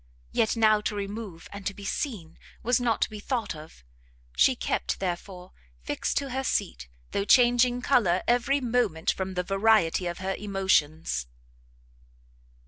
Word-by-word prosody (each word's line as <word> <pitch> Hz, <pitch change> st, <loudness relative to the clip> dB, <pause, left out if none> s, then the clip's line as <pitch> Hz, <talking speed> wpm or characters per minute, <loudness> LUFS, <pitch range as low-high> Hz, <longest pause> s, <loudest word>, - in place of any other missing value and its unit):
Yet 220 Hz, -, +1 dB
now 215 Hz, -1 st, +4 dB
to 210 Hz, -, -2 dB
remove, 200 Hz, -3 st, -6 dB
and 200 Hz, -1 st, -8 dB
to 200 Hz, -, -3 dB
be 200 Hz, -, -10 dB
seen, 195 Hz, -, -4 dB, 0.2 s
was 245 Hz, +1 st, +2 dB
not 230 Hz, -3 st, +1 dB
to -, -, -2 dB
be 210 Hz, -, -7 dB
thought 225 Hz, -4 st, -2 dB
of; 155 Hz, -, -13 dB, 0.5 s
she -, -, +4 dB
kept, -, -, -2 dB
therefore, 180 Hz, 0 st, -5 dB, 0.3 s
fixed -, -, -2 dB
to 275 Hz, -2 st, -2 dB
her 265 Hz, +1 st, -2 dB
seat, 180 Hz, -, -2 dB, 0.2 s
though 200 Hz, -, 0 dB
changing 245 Hz, +2 st, +4 dB
colour 185 Hz, -10 st, +3 dB
every 245 Hz, +4 st, +2 dB
moment 230 Hz, -10 st, +1 dB
from 190 Hz, 0 st, -4 dB
the 180 Hz, -, 0 dB
variety 195 Hz, -2 st, +2 dB
of 175 Hz, -, -4 dB
her 190 Hz, +1 st, -2 dB
emotions. 160 Hz, -, 0 dB
200 Hz, 150 wpm, -27 LUFS, 180-235 Hz, 0.5 s, now